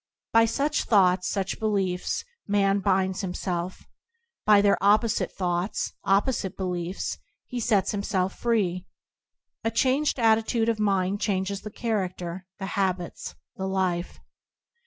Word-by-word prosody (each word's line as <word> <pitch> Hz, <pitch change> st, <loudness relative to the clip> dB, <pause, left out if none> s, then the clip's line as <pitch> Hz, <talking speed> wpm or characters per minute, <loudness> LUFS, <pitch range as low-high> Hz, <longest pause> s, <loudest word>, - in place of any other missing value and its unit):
By 225 Hz, 0 st, +6 dB
such 285 Hz, +6 st, 0 dB
thoughts, 185 Hz, -4 st, +4 dB
such 190 Hz, -1 st, -2 dB
beliefs, 195 Hz, -5 st, -1 dB, 0.2 s
man 200 Hz, -1 st, +2 dB
binds 190 Hz, -1 st, +1 dB
himself; 180 Hz, -1 st, -4 dB, 0.6 s
by 210 Hz, -1 st, +7 dB
their 200 Hz, 0 st, +3 dB
opposite 210 Hz, +2 st, +3 dB
thoughts, 180 Hz, +1 st, -2 dB
opposite 195 Hz, -1 st, +1 dB
beliefs, 180 Hz, -1 st, -3 dB, 0.3 s
he 250 Hz, -, -5 dB
sets 210 Hz, -5 st, +2 dB
himself 195 Hz, -2 st, -1 dB
free. 190 Hz, -6 st, 0 dB, 0.8 s
A 225 Hz, -, +1 dB
changed 265 Hz, +6 st, +1 dB
attitude 225 Hz, 0 st, +3 dB
of 225 Hz, -2 st, 0 dB
mind 195 Hz, -1 st, +1 dB
changes 195 Hz, -1 st, -1 dB
the 210 Hz, -, -7 dB
char 225 Hz, +1 st, -1 dB
acter, 180 Hz, 0 st, -7 dB
the 195 Hz, -, -5 dB
habits, 185 Hz, -3 st, -2 dB, 0.2 s
the 190 Hz, -, -2 dB
life. 185 Hz, -2 st, -1 dB
195 Hz, 125 wpm, -26 LUFS, 185-220 Hz, 0.8 s, by